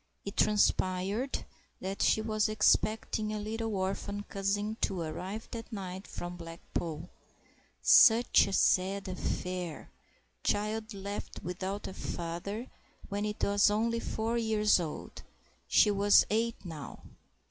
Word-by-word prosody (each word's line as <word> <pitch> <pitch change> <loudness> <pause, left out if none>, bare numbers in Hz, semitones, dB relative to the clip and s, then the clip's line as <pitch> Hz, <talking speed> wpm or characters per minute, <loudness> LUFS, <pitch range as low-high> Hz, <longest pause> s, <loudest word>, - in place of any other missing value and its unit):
It 200 - -5
transpired 205 +3 +1 0.3
that 195 +1 -4
she 220 - +3
was 215 -1 +1
expecting 215 0 +2
a 215 - -2
little 220 +1 -3
orphan 195 +2 -2
cousin 205 +2 -1
to 190 - 0
arrive 185 +7 -5
that 230 0 -7
night 190 -2 -6
from 175 0 -6
Blackpool; 165 -1 -5 0.8
such 235 -3 +7
a 195 - -4
sad 195 +1 +2
affair—child 185 - -4
left 200 +1 -6
without 190 +3 -4
a - - -6
father 175 +8 -4 0.4
when 205 +1 -2
it 210 0 -4
was 200 0 +4
only 230 +3 +1
four 230 +1 -1
years 215 -3 +3
old—she 175 +5 -1
was 205 0 +5
eight 225 -1 0
now. 160 -5 -8
200 Hz, 115 wpm, -31 LUFS, 185-215 Hz, 0.8 s, such